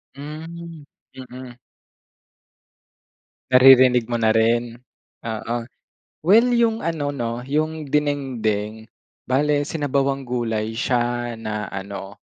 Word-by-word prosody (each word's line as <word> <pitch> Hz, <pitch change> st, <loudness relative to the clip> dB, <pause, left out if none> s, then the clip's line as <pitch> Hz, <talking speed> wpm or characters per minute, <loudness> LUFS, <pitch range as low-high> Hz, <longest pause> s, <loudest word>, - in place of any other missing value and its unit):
Hmm, 160 Hz, +2 st, -9 dB, 0.3 s
mm. 125 Hz, -1 st, -10 dB, 1.9 s
Naririnig 125 Hz, -2 st, +6 dB
mo 120 Hz, -, 0 dB
na 110 Hz, -1 st, +2 dB
rin, 115 Hz, +1 st, +2 dB, 0.5 s
oo. 115 Hz, +1 st, -3 dB, 0.6 s
Well, 225 Hz, +9 st, +5 dB
yung 230 Hz, -1 st, +1 dB
ano, 160 Hz, -4 st, -1 dB
'no 120 Hz, -4 st, -3 dB
yung 155 Hz, +1 st, -2 dB
dinengdeng, 115 Hz, -8 st, -1 dB, 0.4 s
bale 145 Hz, +3 st, +1 dB
sinabawang 140 Hz, -3 st, -1 dB
gulay 115 Hz, -4 st, -2 dB
siya 120 Hz, -1 st, -1 dB
na 110 Hz, -2 st, -4 dB
ano, 95 Hz, 0 st, -7 dB
130 Hz, 95 wpm, -22 LUFS, 115-145 Hz, 1.9 s, Naririnig